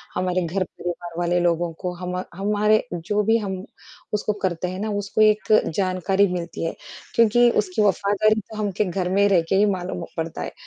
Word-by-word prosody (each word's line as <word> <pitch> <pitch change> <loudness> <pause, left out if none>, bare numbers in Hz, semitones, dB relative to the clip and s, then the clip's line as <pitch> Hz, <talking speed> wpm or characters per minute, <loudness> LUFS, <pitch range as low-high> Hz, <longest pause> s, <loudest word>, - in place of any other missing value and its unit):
हमारे 185 0 0
घर 180 +3 -1
परिवार 175 -1 -7
वाले 175 0 +1
लोगों 170 -1 +1
को। 180 - -2
हम 180 +1 -5 0.2
हमारे 210 +2 +2
जो 205 +5 -1
भी 225 +2 +3
हम 190 -4 -4 0.5
उसको 210 0 0
करते 180 -1 -1
हैं 185 +1 -5
ना 215 +1 -2
उसको 205 +2 -1
एक 215 0 +4 0.3
जानकारी 190 +1 +2
मिलती 170 -2 -4
है, 165 - -2 0.4
क्योंकि 235 +1 +5
उसकी 195 +1 -2
वफ़ादारी 205 +2 +2
तो 215 +2 -12
हम 210 -2 -1
के 210 - +4
घर 180 0 -2
में 200 +1 +4
रहकर 180 -1 +2
ही 200 +2 +5
मालूम 180 -2 -4
पड़ता 165 0 -3
है। - - -4
190 Hz, 185 wpm, -23 LUFS, 175-210 Hz, 0.5 s, क्योंकि